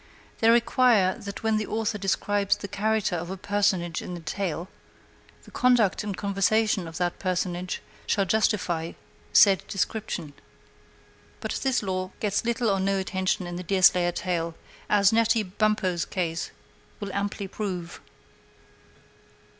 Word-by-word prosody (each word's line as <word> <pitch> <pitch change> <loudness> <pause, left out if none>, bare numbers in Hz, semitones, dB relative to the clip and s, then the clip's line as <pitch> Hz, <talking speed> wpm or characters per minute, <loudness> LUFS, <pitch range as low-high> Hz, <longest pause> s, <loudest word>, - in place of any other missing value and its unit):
They 225 - +4
require 235 -4 +4
that 200 +1 -7
when 220 -1 +2
the 215 - -2
author 220 -1 -1
describes 200 +1 +1
the 200 - -6
character 210 -1 0
of 170 +1 -4
a 190 - -5
personage 190 -4 0
in 180 - -6
his 170 -2 -10
tale, 175 0 -3 0.8
the - - -16
conduct 245 -7 +3
and 205 -2 -4
conversation 200 -1 +1
of 165 0 -8
that 175 -1 -1
personage 180 -1 -2 0.2
shall 200 -2 +2
justify 180 -5 0 0.4
said 195 -2 +6
description. 195 -6 -3 1.1
But - - -4
this 265 -4 +1
law 185 -1 -2
gets 205 -1 0
little 235 0 0
or 195 - +1
no 195 +1 +1
attention 190 -1 -1
in 175 0 -5
the 180 - -5
Deerslayer 180 -1 +4
tale, 170 -2 -2 0.3
as 200 0 +4
Natty 230 0 +3
Bumppo's 190 -3 0
case 170 -3 -2 0.5
will 200 -3 -5
amply 200 0 -2
prove. 185 -4 -5
195 Hz, 140 wpm, -26 LUFS, 180-215 Hz, 1.1 s, said